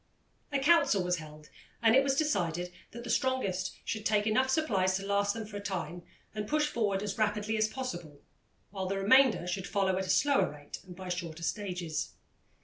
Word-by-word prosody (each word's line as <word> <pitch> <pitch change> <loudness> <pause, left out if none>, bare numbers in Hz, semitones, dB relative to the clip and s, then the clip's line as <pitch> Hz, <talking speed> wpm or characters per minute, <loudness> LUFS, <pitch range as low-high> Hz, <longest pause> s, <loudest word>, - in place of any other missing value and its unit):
A 280 - +1
council 275 - +4
was 180 0 0
held, 155 -1 -11 0.3
and 225 0 +5
it 270 - +7
was 270 0 +1
decided 180 - 0 0.2
that 235 +2 -9
the 240 - -7
strongest 225 -8 0
should 215 -2 -3
take 210 -1 +2
enough 255 +5 +2
supplies 200 -11 +2
to 195 - -6
last 200 +1 +1
them 225 -1 -4
for 205 -1 -7
a - - -6
time 175 -4 -4 0.3
and 210 -1 -4
push 300 +3 +2
forward 210 -9 0
as 205 0 -4
rapidly 210 0 0
as 215 0 +2
possible, 175 - -6 0.5
while 190 -2 -3
the 195 +1 -1
remainder 225 +1 +5
should 180 +2 -3
follow 190 -2 +1
at 190 - -3
a - - -7
slower 285 +7 +3
rate 145 -1 -9
and 180 - -10
by 185 0 -8
shorter 170 -2 -4
stages. 180 -4 -3
200 Hz, 195 wpm, -31 LUFS, 180-230 Hz, 0.5 s, it